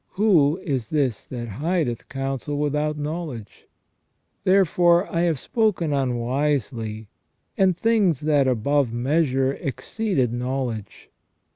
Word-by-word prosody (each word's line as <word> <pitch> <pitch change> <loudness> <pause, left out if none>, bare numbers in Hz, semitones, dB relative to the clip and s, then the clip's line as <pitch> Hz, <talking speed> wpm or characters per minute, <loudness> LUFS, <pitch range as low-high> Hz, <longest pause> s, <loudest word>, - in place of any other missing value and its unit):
Who 175 -7 +3
is 130 - -2
this 135 -8 -1
that 120 -2 -5
hideth 140 - -2
counsel 135 +1 -3
without 150 +1 0
knowledge? 150 - -6 0.8
Therefore 180 -2 +4
I - - +2
have 170 -3 +1
spoken 185 - 0
unwisely, 125 -4 -1 0.5
and 185 -3 +2
things 205 - +2
that 145 -3 +2
above 130 +1 +1
measure 135 +1 +1
exceeded 140 - -2
know 130 +2 -1
ledge. 110 -5 -7
145 Hz, 110 wpm, -23 LUFS, 125-170 Hz, 0.8 s, Therefore